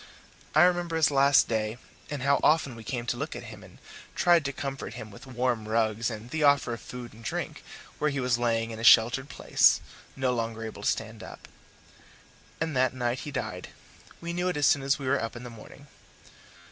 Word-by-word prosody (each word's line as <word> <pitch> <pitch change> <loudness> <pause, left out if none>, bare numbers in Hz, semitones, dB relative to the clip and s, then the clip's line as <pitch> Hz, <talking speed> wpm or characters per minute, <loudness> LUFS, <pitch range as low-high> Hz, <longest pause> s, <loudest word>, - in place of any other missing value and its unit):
I 155 - +7
remember 175 -2 +2
his 160 -2 +3
last 140 0 +5
day, 110 0 -2 0.3
and 145 -4 -4
how 140 +1 +3
often 150 -5 +2
we 115 - -10
came 120 +1 -4
to 120 - -2
look - - -4
at - - -7
him - - -12
and - - -16 0.4
tried 175 -2 +4
to 140 - -1
comfort 135 -6 -6
him 110 -3 -8
with 115 +7 -13
warm 125 -3 -1
rugs 110 +1 0
and 115 +1 -8
the 160 - -2
offer 140 -4 +3
of 115 - -7
food 125 -1 -9
and 115 +1 -15
drink - - -4 0.4
where 150 - +2
he 140 -1 -3
was 125 -2 +1
lying 115 -1 0
in 110 - -7
a - - -6
sheltered 120 +5 +5
place, - - +3 0.4
no 130 -2 0
longer 115 -1 -3
able 110 -2 -8
to - - +1
stand 110 0 -3
up. - - -11 1.1
And 160 -3 -2
that 130 0 +2
night 120 0 -1
he - - -6
died: 90 -9 -4 0.5
we 170 0 -4
knew 180 +1 -1
it 180 -4 -1
as 145 - +2
soon 140 - +4
as 135 0 +1
we 140 - -7
were 135 +2 +1
up 115 +1 -4
in 120 - -8
the 120 - -8
morning. 115 +5 -13
125 Hz, 215 wpm, -28 LUFS, 115-140 Hz, 1.1 s, I